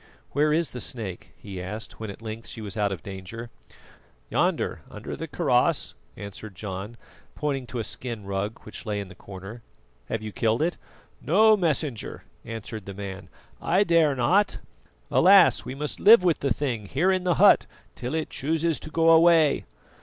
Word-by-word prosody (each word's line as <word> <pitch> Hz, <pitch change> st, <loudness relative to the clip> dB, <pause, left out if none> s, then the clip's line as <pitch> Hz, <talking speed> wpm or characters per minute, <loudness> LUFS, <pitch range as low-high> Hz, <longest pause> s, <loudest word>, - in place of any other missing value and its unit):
"Where 150 Hz, +2 st, +2 dB
is 165 Hz, +1 st, +1 dB
the 125 Hz, -, -5 dB
snake?" 105 Hz, -8 st, -4 dB
he 95 Hz, -3 st, -8 dB
asked 105 Hz, +4 st, -7 dB
when 110 Hz, -1 st, -5 dB
at 100 Hz, +3 st, -10 dB
length 110 Hz, +1 st, -6 dB
she -, -, -9 dB
was 105 Hz, -2 st, -6 dB
out 105 Hz, -2 st, +1 dB
of 90 Hz, -5 st, -5 dB
danger. 100 Hz, +5 st, -8 dB, 0.8 s
"Yonder, -, -, 0 dB
under -, -, -7 dB
the -, -, -6 dB
kaross," -, -, +1 dB, 0.2 s
answered 100 Hz, 0 st, -9 dB
John, 100 Hz, +3 st, -6 dB, 0.4 s
pointing 135 Hz, -4 st, -2 dB
to 120 Hz, -, -6 dB
a 115 Hz, -, -1 dB
skin 115 Hz, -1 st, -6 dB
rug 100 Hz, +3 st, -3 dB
which 105 Hz, -, -9 dB
lay 105 Hz, -1 st, -1 dB
in 100 Hz, -2 st, -6 dB
the -, -, -11 dB
corner. 95 Hz, +5 st, -10 dB, 0.4 s
"Have 110 Hz, -, -4 dB
you 110 Hz, -, -5 dB
killed 115 Hz, +6 st, +1 dB
it?" 175 Hz, +2 st, 0 dB, 0.5 s
"No, 215 Hz, +7 st, +5 dB
Messenger," 155 Hz, -, -2 dB, 0.2 s
answered 110 Hz, -2 st, -7 dB
the 100 Hz, -, -7 dB
man, 95 Hz, -2 st, -7 dB, 0.3 s
"I 185 Hz, +4 st, +3 dB
dare 165 Hz, -6 st, +3 dB
not. 180 Hz, +12 st, +2 dB, 0.5 s
Alas! 190 Hz, 0 st, +6 dB
we 130 Hz, -, -5 dB
must 150 Hz, +1 st, -4 dB
live 215 Hz, -1 st, +8 dB
with 175 Hz, -3 st, +2 dB
the 140 Hz, -, -1 dB
thing 115 Hz, -5 st, -2 dB
here 170 Hz, -, +2 dB
in 185 Hz, -1 st, 0 dB
the 180 Hz, -2 st, +2 dB
hut -, -, +6 dB, 0.3 s
till 125 Hz, +5 st, -4 dB
it 160 Hz, -1 st, -2 dB
chooses 160 Hz, +3 st, 0 dB
to -, -, -7 dB
go 165 Hz, +1 st, +4 dB
away." 165 Hz, -2 st, +5 dB
120 Hz, 175 wpm, -26 LUFS, 105-160 Hz, 0.8 s, live